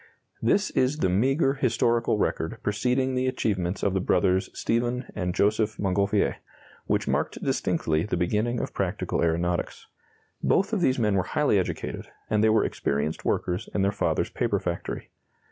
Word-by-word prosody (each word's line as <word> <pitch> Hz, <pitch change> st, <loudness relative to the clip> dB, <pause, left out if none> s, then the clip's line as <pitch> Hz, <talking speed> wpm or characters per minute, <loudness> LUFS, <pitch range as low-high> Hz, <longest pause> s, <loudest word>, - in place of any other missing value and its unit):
This 205 Hz, 0 st, +2 dB
is 130 Hz, +3 st, +1 dB
the 95 Hz, -, +1 dB
meagre 135 Hz, -, +2 dB
historical 115 Hz, -3 st, +1 dB
record -, -, -1 dB
preceding 125 Hz, +5 st, 0 dB
the 130 Hz, 0 st, 0 dB
achievements 95 Hz, -7 st, -1 dB
of 100 Hz, -, +2 dB
the 95 Hz, -, +1 dB
brothers 95 Hz, +1 st, +2 dB
Stephen 120 Hz, +2 st, -1 dB
and 90 Hz, -3 st, -2 dB
Joseph 110 Hz, +1 st, +1 dB
Montgolfier, 100 Hz, +1 st, +1 dB, 0.5 s
which -, -, 0 dB
marked -, -, -1 dB
distinctly 80 Hz, -1 st, 0 dB
the 90 Hz, -, -2 dB
beginning 105 Hz, +7 st, 0 dB
of -, -, -4 dB
practical -, -, -1 dB
aeronautics. 85 Hz, +1 st, -1 dB, 0.6 s
Both 195 Hz, +3 st, +2 dB
of 205 Hz, -, +1 dB
these 130 Hz, -6 st, +3 dB
men 105 Hz, -4 st, +2 dB
were 95 Hz, -, +3 dB, 0.2 s
highly -, -, +4 dB
educated, -, -, -4 dB, 0.2 s
and 105 Hz, 0 st, +3 dB
they 110 Hz, -, +5 dB
were 110 Hz, -, +3 dB
experienced 70 Hz, +3 st, -2 dB
workers 90 Hz, +5 st, -1 dB
in 100 Hz, -, +2 dB
their 100 Hz, -, +2 dB
father's 100 Hz, -, -1 dB
paper -, -, 0 dB
factory. -, -, -4 dB
105 Hz, 160 wpm, -26 LUFS, 95-125 Hz, 0.6 s, they